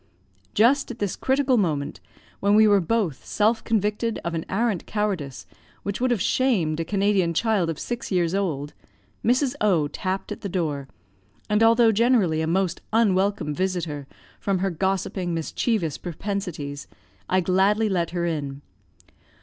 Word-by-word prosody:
Just 265 +6 +4
at 245 - -6
this 205 -5 -2
critical 265 -1 +2
moment, 155 -8 -1 0.4
when 200 +1 +3
we 215 0 +7
were 205 -2 +5
both 180 - -1
self 220 +2 +1
convicted 220 +1 0
of 170 - -2
an 165 -1 -3
arrant 215 -3 0
cowardice, 190 - -2 0.4
which 200 +3 -3
would 255 - +2
have 240 -4 +1
shamed 185 -13 +1
a - - 0
Canadian 195 -2 +1
child 210 -4 +1
of 165 - -3
six 240 -2 -4
years 175 -2 +1
old, 155 -8 -2 0.5
Mrs. 255 +3 +2
O 175 -8 +3
tapped 185 +5 -4
at - - -5
the 200 - -4
door, 150 -7 -2 0.6
and 210 +1 +3
although 230 0 +6
generally 215 -8 +3
a 160 - -1
most 180 +1 0
unwelcome 200 -7 +2
visitor, 170 -5 -2 0.3
from 195 -1 0
her 190 +1 0
gossiping, 185 0 -1
mischievous 165 - -1
propensities, 175 -6 -5 0.4
I 185 - +3
gladly 195 +5 +2
let 175 -4 0
her 175 0 -2
in. 145 -4 -3
190 Hz, 150 wpm, -24 LUFS, 165-220 Hz, 0.6 s, we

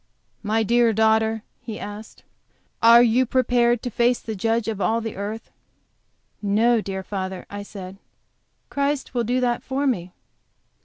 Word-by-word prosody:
"My 220 +1 +1
dear 235 +1 +3
daughter," 220 0 +2 0.2
he 220 -3 -7
asked, 210 +2 -9 0.6
"are 235 +1 +8
you 245 +2 +3
prepared 240 -2 +2
to 245 - -3
face 240 +2 +2
the 220 - -6
Judge 225 +3 0
of 215 -3 -3
all 225 +3 +1
the 225 -1 -5
earth?" 210 +3 -6 0.9
"No, 220 +3 +2
dear 190 -1 -5
father," 190 -1 -5
I 205 0 -5
said, 195 -2 -9 0.7
"Christ 280 -1 -1
will 240 -2 0
do 245 +3 0
that 240 -1 0
for 275 +2 -2
me." 185 -10 -1
225 Hz, 150 wpm, -23 LUFS, 205-240 Hz, 0.9 s, are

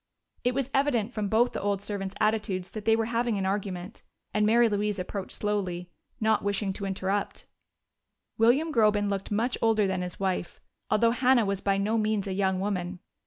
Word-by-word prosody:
It 245 0 +1
was 270 -1 -1
evident 255 -5 +1
from 215 -2 -2
both 230 +4 +3
the - - -3
old 200 -1 0
servants' 195 -1 -4
attitudes 210 -4 0
that 215 -1 -7
they 225 - +5
were 225 0 0
having 235 -1 0
an 190 - -1
argument, 190 0 -3 0.3
and 210 0 +2
Mary 235 +2 +5
Louise 210 -1 0
approached 190 +1 -5
slowly, 185 -4 -2 0.3
not 220 0 +2
wishing 200 -1 -1
to 200 - -5
interrupt. 195 +1 -2 0.9
William 270 +8 +3
Groben 210 -3 +3
looked 195 -1 -3
much 230 +4 0
older 220 -2 +3
than 190 -1 -1
his 180 0 -6
wife, 190 -3 -2 0.3
although 230 +2 +4
Hannah 250 -1 +3
was 195 -1 -1
by 195 -1 +1
no 215 +3 +1
means 215 -2 0
a 195 - -3
young 190 -1 +1
woman. 185 -2 -2
205 Hz, 185 wpm, -28 LUFS, 195-225 Hz, 0.9 s, they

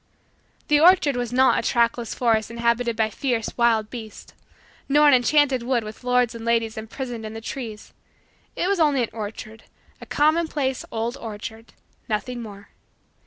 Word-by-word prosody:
The 295 0 +4
orchard 330 -4 +5
was 245 -1 -3
not 260 +1 +4
a - - -1
trackless 235 -1 0
forest 225 -3 +1
inhabited 235 0 0
by 220 -1 0
fierce, 235 -1 -2
wild 225 -3 +2
beasts; 220 -4 -9 0.6
nor 295 +2 +5
an 290 - +6
enchanted 265 +1 +3
wood 240 -1 0
with 215 +3 -10
lords 250 -1 +2
and 230 -1 -8
ladies 230 -1 0
imprisoned 230 +1 -6
in 215 0 -7
the - - -5
trees; 225 -2 -7 0.6
it - - -1
was 395 -1 +1
only 290 -5 +3
an 230 - -3
orchard 220 0 -7 0.4
a - - -10
commonplace 300 -3 +1
old 230 +3 -3
orchard 220 -1 -8 0.4
nothing 240 +3 -3
more. 205 -2 -11
235 Hz, 160 wpm, -23 LUFS, 225-265 Hz, 0.6 s, an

